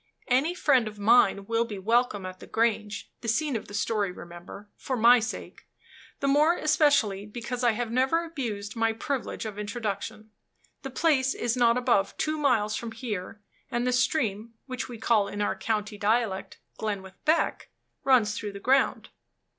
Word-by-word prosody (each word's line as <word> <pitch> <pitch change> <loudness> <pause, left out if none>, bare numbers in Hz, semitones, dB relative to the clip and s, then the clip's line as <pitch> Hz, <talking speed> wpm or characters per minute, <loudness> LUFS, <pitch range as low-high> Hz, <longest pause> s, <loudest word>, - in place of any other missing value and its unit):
Any 275 +8 +2
friend 265 -10 +3
of 210 0 -8
mine 205 -2 +4
will 230 +2 +1
be 220 -3 -6
welcome 215 0 +1
at 185 0 -7
the - - -11
Grange 220 -2 -1
(the 230 - -7
scene 275 +4 +1
of 220 - -4
the 205 - -11
story, 205 -2 0
remember), 175 +4 -11
for 260 - -3
my 240 +2 +7
sake 220 +1 -6 0.5
the 275 - +1
more 300 +5 +4
especially 265 -10 +2
because 240 +3 -5
I 240 -2 +4
have 230 +1 -3
never 265 +7 +2
abused 225 -10 -5
my 225 -1 +1
privilege 250 +1 -4
of 210 -1 -6
introduction. 215 0 -4 0.5
The 270 - -6
place 270 -2 +2
is 240 0 -1
not 240 -1 +4
above 235 -6 +1
two 310 0 -1
miles 220 -7 +2
from 230 0 -5
here, 215 -3 -5 0.3
and 240 +1 -1
the 250 - +1
stream 230 -4 0
(which 255 -1 -5
we 240 - -7
call, 215 -2 +2
in 205 - -6
our 205 - 0
county 210 -2 -2
dialect, 215 -2 0 0.2
Glenwith 195 -3 -5
Beck) 315 +2 +1 0.3
runs 230 -6 +4
through 210 -3 -5
the 200 - -7
ground." 265 +5 +2
230 Hz, 170 wpm, -27 LUFS, 210-255 Hz, 0.5 s, my